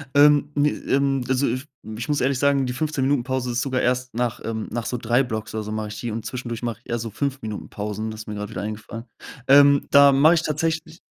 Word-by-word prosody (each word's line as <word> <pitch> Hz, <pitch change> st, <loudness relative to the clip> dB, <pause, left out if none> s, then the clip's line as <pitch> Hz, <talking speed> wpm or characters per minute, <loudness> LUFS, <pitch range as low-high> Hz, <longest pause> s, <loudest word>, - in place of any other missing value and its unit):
Ähm, 145 Hz, 0 st, +5 dB
ne, 145 Hz, +1 st, +3 dB
ähm, 135 Hz, -2 st, 0 dB
also, 130 Hz, +1 st, +1 dB
f 130 Hz, +4 st, -2 dB, 0.3 s
ich 115 Hz, -, -5 dB
muss 145 Hz, -3 st, 0 dB
ehrlich 130 Hz, 0 st, +1 dB
sagen, 140 Hz, -1 st, +2 dB
die 125 Hz, -, -2 dB
15- 145 Hz, 0 st, -2 dB
Minuten-Pause 130 Hz, -2 st, 0 dB
ist 120 Hz, -, -1 dB
sogar 130 Hz, -2 st, -1 dB
erst 125 Hz, +1 st, 0 dB
nach, 120 Hz, 0 st, -1 dB
ähm 110 Hz, -1 st, -4 dB
nach 115 Hz, 0 st, -3 dB
so 125 Hz, -, -2 dB
3 120 Hz, +3 st, +2 dB
Blocks 110 Hz, -2 st, -5 dB
oder 110 Hz, -, -3 dB
so 105 Hz, -, -5 dB
mache 110 Hz, -1 st, -3 dB
ich 105 Hz, -, -7 dB
die 120 Hz, -, -4 dB
und 110 Hz, 0 st, -5 dB
zwischendurch 120 Hz, -1 st, -5 dB
mache 115 Hz, -2 st, -3 dB
ich -, -, -23 dB
eher 120 Hz, -, 0 dB
so 115 Hz, 0 st, -4 dB
5- 135 Hz, +5 st, -3 dB
Minuten-Pausen, 105 Hz, 0 st, -5 dB
das 110 Hz, 0 st, -8 dB
ist -, -, -11 dB
mir 105 Hz, -, -5 dB
grad 105 Hz, 0 st, -5 dB
wieder -, -, -5 dB
eingefallen. 110 Hz, +2 st, -6 dB, 0.5 s
Ähm, 140 Hz, 0 st, +6 dB
da 140 Hz, 0 st, +8 dB
mache 155 Hz, +5 st, +6 dB
ich 160 Hz, -, 0 dB
tatsächlich 160 Hz, +2 st, -2 dB
125 Hz, 245 wpm, -23 LUFS, 110-140 Hz, 0.5 s, da